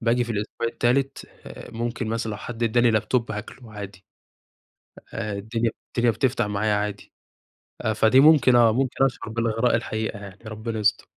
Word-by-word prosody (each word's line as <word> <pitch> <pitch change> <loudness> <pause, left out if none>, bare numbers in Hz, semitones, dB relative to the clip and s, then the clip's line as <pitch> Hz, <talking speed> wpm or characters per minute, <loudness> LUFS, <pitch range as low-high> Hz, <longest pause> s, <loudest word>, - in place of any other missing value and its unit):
باجي 120 +1 +2
في 120 - -4
الأسبوع 105 +2 -3
التالت 130 +4 0 0.2
آآ - - -10
ممكن 120 0 -3
مثلًا 115 0 -2
لو 105 - -4
حد 120 +2 -7
إداني 120 +1 +3
لاب 110 -1 0
توب 120 -3 0
هاكله 110 +2 -8
عادي، 100 -2 -9 1.1
آآ 105 -2 -3
الدنيا 110 +3 -2 0.2
الدنيا 120 -1 +1
بتفتح 120 0 0
معايا 105 +1 0
عادي، 105 - -4 0.8
فدي 110 +4 +5
ممكن 145 -4 +6
آه، 115 -2 +6
ممكن 135 +2 +1
أشعر 130 -3 -2
بالإغراء 115 +1 0
الحقيقة 110 -2 -3
يعني، 100 -2 -10
ربنا 110 +1 -5
يستر. 105 0 +1
115 Hz, 160 wpm, -24 LUFS, 110-120 Hz, 1.1 s, ممكن